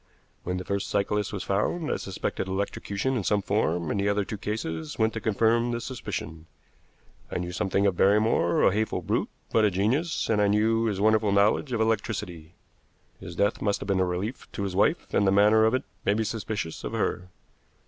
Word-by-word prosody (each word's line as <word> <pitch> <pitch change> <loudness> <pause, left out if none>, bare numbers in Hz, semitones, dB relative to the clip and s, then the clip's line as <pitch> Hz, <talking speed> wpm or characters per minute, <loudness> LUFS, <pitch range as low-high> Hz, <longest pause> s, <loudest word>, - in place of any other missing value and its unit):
When 90 +1 -2
the 90 - -5
first 100 0 -2
cyclist 105 0 0
was 100 - -4
found, 130 - -1
I - - 0
suspected 95 0 -4
electrocution 100 +5 -2
in 115 - -1
some 105 +1 +1
form, 90 -5 0
and 100 - -1
the 100 +1 +1
other 100 -1 +1
two 105 - -6
cases 80 -8 -4
went 110 0 +2
to 110 - -4
confirm 115 +2 +2
the 120 0 -2
suspicion. 105 -9 -6 0.8
I - - -3
knew 90 0 -4
something 95 +2 0
of 95 -3 +1
Barrymore, 100 -3 +3
a - - +5
hateful 110 +1 -1
brute - - -1 0.2
but 110 - +3
a 105 - +5
genius, 120 - 0
and 105 -2 +2
I 105 - +4
knew 110 +2 +2
his 105 -4 -1
wonderful 110 0 +3
knowledge 100 +7 +2
of 115 -2 0
electricity. 95 -7 -2 0.6
His - - -9
death 100 +2 +1
must 100 -1 0
have - - -7
been 100 -2 +1
a - - +4
relief 90 +7 -4
to 100 - -3
his 95 -2 -3
wife, 105 - +1
and 100 - +3
the - - +4
manner 105 +2 +5
of 110 +3 +3
it 130 - -1 0.2
made 100 - +2
me 110 - +1
suspicious 105 -6 -4
of - - -5
her. 90 +1 -2
100 Hz, 205 wpm, -27 LUFS, 95-110 Hz, 0.8 s, a